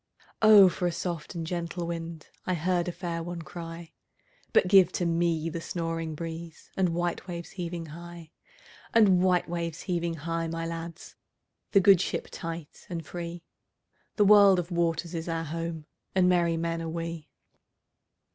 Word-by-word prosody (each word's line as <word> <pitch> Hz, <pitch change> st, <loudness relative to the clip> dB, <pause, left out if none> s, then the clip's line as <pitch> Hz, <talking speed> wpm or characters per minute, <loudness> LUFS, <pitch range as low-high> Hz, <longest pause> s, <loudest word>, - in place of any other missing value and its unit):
"O 215 Hz, -3 st, +9 dB
for 180 Hz, 0 st, 0 dB
a -, -, 0 dB
soft 170 Hz, -2 st, -4 dB
and 165 Hz, -1 st, -3 dB
gentle 170 Hz, 0 st, -3 dB
wind!"I 165 Hz, +1 st, -5 dB
heard 175 Hz, +1 st, 0 dB
a -, -, -1 dB
fair 170 Hz, -1 st, -4 dB
one 170 Hz, 0 st, -5 dB
cry:But 165 Hz, +2 st, -4 dB
give 190 Hz, -1 st, +6 dB
to 175 Hz, -, -1 dB
me 165 Hz, -1 st, +1 dB
the 165 Hz, 0 st, -4 dB
snoring 165 Hz, -2 st, -3 dB
breezeAnd 165 Hz, +3 st, -4 dB
white 175 Hz, +2 st, -2 dB
waves 170 Hz, -2 st, -6 dB
heaving 175 Hz, -3 st, -5 dB
high; 170 Hz, +1 st, -10 dB, 0.6 s
And 195 Hz, -5 st, +6 dB
white 180 Hz, -1 st, +3 dB
waves 170 Hz, -1 st, -3 dB
heaving 170 Hz, -2 st, -1 dB
high, 165 Hz, +2 st, -2 dB
my 165 Hz, 0 st, -3 dB
lads, 165 Hz, 0 st, -7 dB, 0.6 s
The 200 Hz, -, +7 dB
good 195 Hz, -2 st, +7 dB
ship -, -, -3 dB
tight 165 Hz, -3 st, -7 dB
and 165 Hz, -3 st, -4 dB
free—The 175 Hz, +4 st, -5 dB
world 200 Hz, -2 st, +8 dB
of 180 Hz, 0 st, -3 dB
waters 170 Hz, 0 st, 0 dB
is 165 Hz, 0 st, -4 dB
our 165 Hz, 0 st, -1 dB
home, 165 Hz, 0 st, -4 dB, 0.3 s
And 185 Hz, -1 st, +4 dB
merry 170 Hz, -2 st, +3 dB
men 165 Hz, 0 st, -2 dB
are 165 Hz, -, -4 dB
we. 165 Hz, -1 st, -5 dB
170 Hz, 150 wpm, -28 LUFS, 165-175 Hz, 0.6 s, O